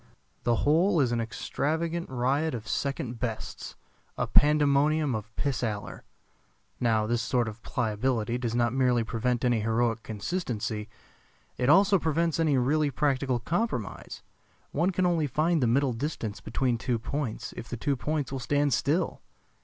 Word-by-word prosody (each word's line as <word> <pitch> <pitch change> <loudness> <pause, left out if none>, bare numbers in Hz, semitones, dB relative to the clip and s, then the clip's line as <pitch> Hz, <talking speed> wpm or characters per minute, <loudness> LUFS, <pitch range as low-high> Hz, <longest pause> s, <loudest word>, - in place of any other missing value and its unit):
The 120 - +3
whole 165 +4 +4
is 130 -4 +2
an 120 -1 0
extravagant 160 +8 -2
riot 130 +4 0
of 110 -2 -7
second 130 -4 -2
bests, 115 -4 -5 0.4
a - - 0
pandemonium 150 0 +3
of 105 -1 -4
pis 140 -4 -1
aller. 105 -3 -4 0.7
Now 110 -3 +2
this 120 +1 0
sort 120 +1 +1
of 110 0 -7
pliability 115 +2 -1
does 120 -2 -2
not 120 -1 +2
merely 125 -3 +2
prevent 120 +2 -1
any 120 -2 +3
heroic 115 +1 +1
consistency, 110 - -3 0.7
it 125 +1 0
also 195 +4 +6
prevents 165 +1 0
any 155 -4 +3
really 145 +4 +2
practical 135 -3 0
compromise. 165 - -3 0.5
One 175 - +1
can 185 -1 +1
only 165 -4 +2
find 155 +4 +1
the 125 - +3
middle 130 +2 +2
distance 115 -4 -4
between 120 0 -1
two 125 0 0
points 125 0 -4
if 120 - -8
the 120 - -4
two 140 +5 0
points 150 +1 -2
will 135 - -3
stand 145 +2 +1
still. 165 +5 0
130 Hz, 155 wpm, -28 LUFS, 115-150 Hz, 0.7 s, also